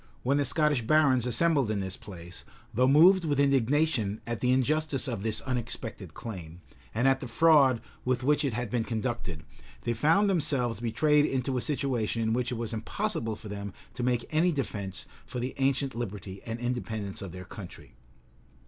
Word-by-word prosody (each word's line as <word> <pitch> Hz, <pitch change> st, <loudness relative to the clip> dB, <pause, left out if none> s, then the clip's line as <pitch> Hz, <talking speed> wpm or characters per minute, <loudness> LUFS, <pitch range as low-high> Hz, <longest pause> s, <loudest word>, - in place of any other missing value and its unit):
When 140 Hz, +3 st, +2 dB
the 145 Hz, -, +2 dB
Scottish 150 Hz, -1 st, +3 dB
barons 130 Hz, -1 st, +3 dB
assembled 140 Hz, -1 st, +2 dB
in 105 Hz, -2 st, 0 dB
this 95 Hz, -1 st, -3 dB
place, 90 Hz, -3 st, -10 dB, 0.3 s
though 125 Hz, +3 st, +3 dB
moved 175 Hz, +7 st, +6 dB
with 145 Hz, -3 st, 0 dB
indignation 140 Hz, -5 st, +2 dB
at 120 Hz, -1 st, -3 dB
the 125 Hz, -, +2 dB
injustice 145 Hz, +3 st, +1 dB
of 115 Hz, -6 st, -3 dB
this 110 Hz, 0 st, 0 dB
unexpected 115 Hz, -, -4 dB
claim, 90 Hz, -7 st, -8 dB, 0.3 s
and 115 Hz, +4 st, +1 dB
at 135 Hz, 0 st, +3 dB
the 130 Hz, -, -6 dB
fraud 135 Hz, -2 st, +5 dB, 0.2 s
with 130 Hz, 0 st, 0 dB
which 150 Hz, +2 st, +3 dB
it 135 Hz, -5 st, 0 dB
had 120 Hz, -3 st, -3 dB
been 120 Hz, -2 st, +1 dB
conducted, 110 Hz, -8 st, -3 dB, 0.4 s
they 120 Hz, -, 0 dB
found 160 Hz, -, +3 dB
themselves 140 Hz, -, +1 dB
betrayed 145 Hz, +6 st, +3 dB
into 130 Hz, -1 st, -1 dB
a 125 Hz, -, 0 dB
situation 120 Hz, -6 st, -1 dB
in 110 Hz, 0 st, +1 dB
which 125 Hz, +1 st, -1 dB
it -, -, -1 dB
was 115 Hz, 0 st, -4 dB
impossible 115 Hz, -, -2 dB
for 105 Hz, -, -11 dB
them 100 Hz, -1 st, -6 dB, 0.2 s
to 125 Hz, -, -5 dB
make 120 Hz, -1 st, 0 dB
any 165 Hz, +3 st, +3 dB
defence 105 Hz, -, -3 dB, 0.2 s
for 125 Hz, -, -5 dB
the 125 Hz, +2 st, -3 dB
ancient 135 Hz, 0 st, +1 dB
liberty 100 Hz, -4 st, -6 dB
and 115 Hz, +1 st, -4 dB
independence 110 Hz, -5 st, -3 dB
of 95 Hz, -3 st, -6 dB
their 90 Hz, +1 st, -8 dB
country. 95 Hz, -1 st, -11 dB
125 Hz, 180 wpm, -29 LUFS, 110-140 Hz, 0.4 s, moved